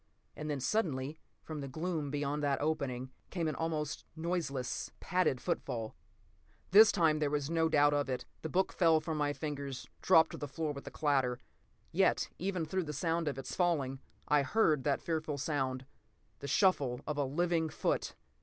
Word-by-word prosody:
And 155 0 -5
then, 145 -2 -1
suddenly, 145 - -1 0.2
from 155 -2 -6
the 140 - -5
gloom 155 +1 -2
beyond 145 +1 -1
that 140 -2 +1
opening, 140 -4 -2 0.2
came 170 -3 -1
an 155 - 0
almost 155 -1 -2
noiseless, 160 -6 -2
padded 180 -8 +1
footfall!" 115 -4 -3 0.8
This 215 +3 +9
time 160 -4 +3
there 150 -2 +1
was 145 +1 -1
no 165 -1 +2
doubt 145 -1 +4
of 145 -1 0
it. 130 -1 -2 0.2
The 160 - -4
book 185 +4 +1
fell 165 -3 +4
from 155 0 -3
my 145 -1 +2
fingers, 140 -3 -5
dropped 160 -3 +5
to - - -6
the 145 - -4
floor 150 +2 -2
with 140 - -9
a - - -2
clatter. 135 -5 +1 0.5
Yet - - +2
even 185 -2 -1
through 185 +3 -1
the 150 - -4
sound 165 +2 0
of 145 - -1
its 135 - -5
falling, 145 -7 +1 0.3
I 150 -1 +4
heard 150 - +2
that 140 -2 +1
fearful 160 -3 -2
sound—the 130 -5 -5
shuffle 140 -6 +2
of 150 -1 -3
a - - +3
living 165 +3 +1
foot! - - -1
150 Hz, 175 wpm, -33 LUFS, 135-165 Hz, 0.8 s, This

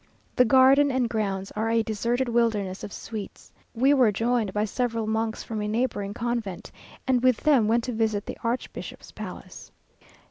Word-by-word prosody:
The 250 - +5
garden 265 +3 +6
and 255 -2 +1
grounds 195 -4 -2
are 220 +1 -2
a 230 0 +2
deserted 235 +4 -1
wilderness 220 -5 0
of - - -6
sweets. 215 -3 -8 0.2
We 265 +5 +4
were 250 -6 +4
joined 225 0 0
by 210 +2 0
several 230 0 -2
monks 220 0 -2
from 220 -2 -4
a 210 - -2
neighbouring 210 -3 -2
convent, 225 -5 -3 0.3
and 255 -2 +2
with 255 -2 +4
them 275 -8 +4
went 230 +2 +2
to 250 - -3
visit 220 -2 0
the - - -7
archbishop's 235 +2 -4
palace. - - -9
230 Hz, 170 wpm, -26 LUFS, 210-245 Hz, 0.3 s, garden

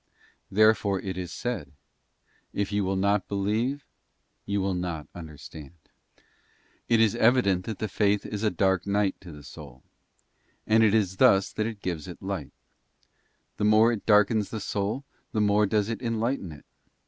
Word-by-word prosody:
There 110 +2 +5
fore 100 -3 -2
is 95 -1 -5
it 90 -1 -4
said, 115 - -4 0.4
' - - -40
If 100 - -2
you 105 0 0
will 95 +1 -1
not 100 +1 +1
believe 110 +8 -1 0.6
you 100 0 0
shall 95 0 0
not 90 -4 -4
under 80 -4 -9
stand.' 75 +1 -11 0.4
t - - -30 0.7
It 115 - +4
is 110 -2 +4
evident 110 -6 +3
that 110 -3 -4
the 110 - -2
faith 100 0 +1
is 105 -1 -5
a 110 - +2
dark 95 -2 0
night 100 -1 0
to 90 -3 -11
the 75 -1 -12
soul, - - -12 0.8
and 110 +1 +4
Faith 110 -2 +5
though 110 - +4
itis 95 -3 0
thus 100 -6 +4
that 110 0 -1
it 110 -3 -8
gives 85 -5 -3
it - - -9
light; - - -5 1.1
the - - -2
more 110 +2 +5
it 110 -4 -5
darkens 105 -1 +4
the 110 - -4
soul 100 +6 -2
lightens - - -42
the 110 - 0
the 105 - +3
more 105 +1 +3
does 105 0 +1
it 115 +1 -4
enlighten 115 -4 -2
it. 75 - -13
100 Hz, 190 wpm, -27 LUFS, 95-110 Hz, 1.1 s, There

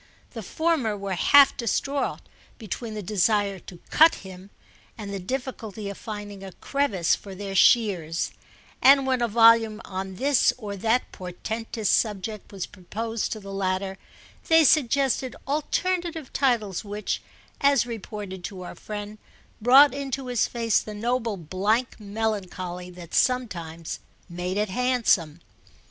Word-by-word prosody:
The 230 - -7
former 265 - 0
were 200 -1 -4
half 280 +9 +6
distraught 275 +4 -1 0.4
between 220 +1 -6
the 210 - -5
desire 200 0 +1
to 180 - -12
"cut" 320 +1 +6
him 190 +1 -11 0.5
and 205 -2 -6
the 195 - -3
difficulty 220 -2 -5
of 200 - -10
finding 205 -2 -7
a 190 -1 -9
crevice 215 -12 0
for 195 -2 -10
their 195 0 -6
shears; 190 -7 +3 0.5
and 275 0 +7
when 260 -2 +1
a 235 - +2
volume 225 -1 +5
on 190 0 -5
this 275 +5 +3
or 210 -4 -6
that 225 +5 0
portentous 220 +4 -5
subject 210 -1 -1
was 195 -3 -4
proposed 220 +4 -4
to 220 - -7
the 195 -1 -9
latter 190 0 -2 0.5
they 325 0 +6
suggested 270 -2 +2
alternative 325 +2 -1
titles 230 -9 +1
which, 205 0 -3 0.4
as 280 -4 +4
reported 210 -5 -7
to 185 -2 -7
our - - -7
friend, 210 0 -7 0.4
brought 270 +5 +7
into 275 -1 -4
his 245 -3 +1
face 230 -3 +1
the 215 - -8
noble 230 -1 -1
blank 200 +10 -1
melancholy 200 -4 -4
that 175 -2 -12
sometimes 170 -11 -1 0.3
made 180 +2 -4
it 210 0 0
handsome. 200 -9 +1
215 Hz, 135 wpm, -25 LUFS, 190-250 Hz, 0.5 s, and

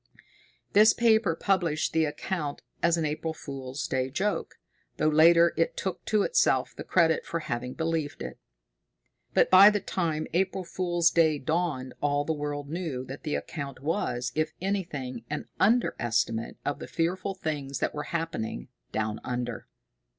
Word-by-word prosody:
This 215 +2 +7
paper 220 -7 +3
published 170 -5 0
the 160 0 +3
account 150 0 -4 0.2
as 170 0 +3
an 160 - 0
April 155 +2 -2
Fool's 135 -2 -6
Day 130 0 -1
joke, 195 +9 -2 0.4
though 155 - +2
later 170 +2 +6
it 165 - 0
took 185 -2 -3
to 210 -2 +2
itself 480 - +2
the - - -6
credit 165 -3 +3
for 165 - -3
having 125 -2 -4
believed 160 -3 -2
it. - - -7 1.0
But - - +4
by 190 +2 +10
the 205 -1 0
time 160 -6 -2
April 190 +1 0
Fool's 175 -1 +1
Day 160 -3 +3
dawned 150 -3 -1
all 145 0 +1
the 160 - 0
world 145 -1 -4
knew 155 -5 -4
that 135 +2 -8
the 150 -3 -2
account 140 -5 -5
was, 130 -6 -1
if 155 +2 -1
anything, 155 - -3
an 150 0 -3
under 235 +5 +3
estimate 115 -1 -1
of 145 - -2
the - - -7
fearful 185 +4 -1
things 145 -6 -3
that - - -1
were 150 - -4
happening 165 - -3 0.2
"down 110 0 -2
under." 120 -2 -4
160 Hz, 160 wpm, -28 LUFS, 140-175 Hz, 1.0 s, by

